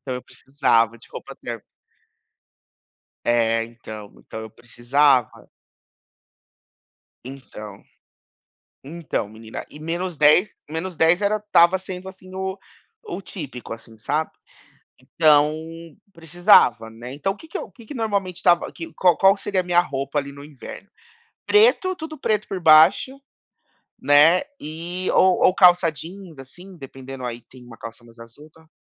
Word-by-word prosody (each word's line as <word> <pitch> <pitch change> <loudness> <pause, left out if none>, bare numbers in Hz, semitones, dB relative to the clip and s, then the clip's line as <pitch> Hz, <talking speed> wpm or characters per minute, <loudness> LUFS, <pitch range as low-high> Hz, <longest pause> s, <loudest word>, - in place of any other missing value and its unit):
Então 130 -2 -5
eu 125 - -6
precisava 115 -4 0
de - - -17
roupa - - -9
térmica. - - -8 1.6
É 115 -1 +2
então, 110 -3 -11
então 110 - -9
eu 110 - -9
precisava. 125 +2 0 1.8
Então 115 -6 -11 1.0
Então 155 -7 -4
menina, 110 +1 -9
e 150 - -13
menos 170 +2 -4
dez 150 +7 +4
menos 165 +4 -5
dez 165 +4 +3
era 210 +1 +1
estava 190 -3 +3
sendo 185 0 -8
assim 185 0 -14
o 190 +1 -4 0.5
o 380 - -6
típico, 135 - -8
assim, 115 -1 -15
sabe, 150 +7 -2 0.7
então 150 +2 +3 0.6
precisava, 165 - +3
né. 120 +3 -10
Então 145 +7 -2
o 200 - -18
que 320 - -14
que 320 - -5
eu - - -6
o - - -19
que 235 - -16
que 255 - -9
normalmente 200 -7 -2
estava 175 -1 +2
que 165 -1 -9
qual 180 -3 +3
qual 195 0 +5
que 200 - -11
seria 200 -2 -1
a - - -10
minha 175 -1 +3
roupa, 140 -2 -4
ali, 140 0 -7
no 140 0 -12
inverno? 150 +7 -11 0.6
Preto, 420 -4 +3
tudo 315 -2 -8
preto 215 -5 -1
por 190 -2 -5
baixo, 165 - +5 0.8
né, 145 +5 +5 0.2
e 170 +4 -5
ou 185 -1 +3
ou 185 - +4
calça 180 -2 +5
jeans, 170 +2 -10
assim, 180 +8 -13
dependendo 135 -2 -9
aí, 120 -1 -6
tem 125 -1 -15
uma 115 -1 -13
calça 115 +2 -10
mais 115 0 -19
azul, 115 +7 -14
tal. 160 0 -22
155 Hz, 150 wpm, -22 LUFS, 125-185 Hz, 1.8 s, qual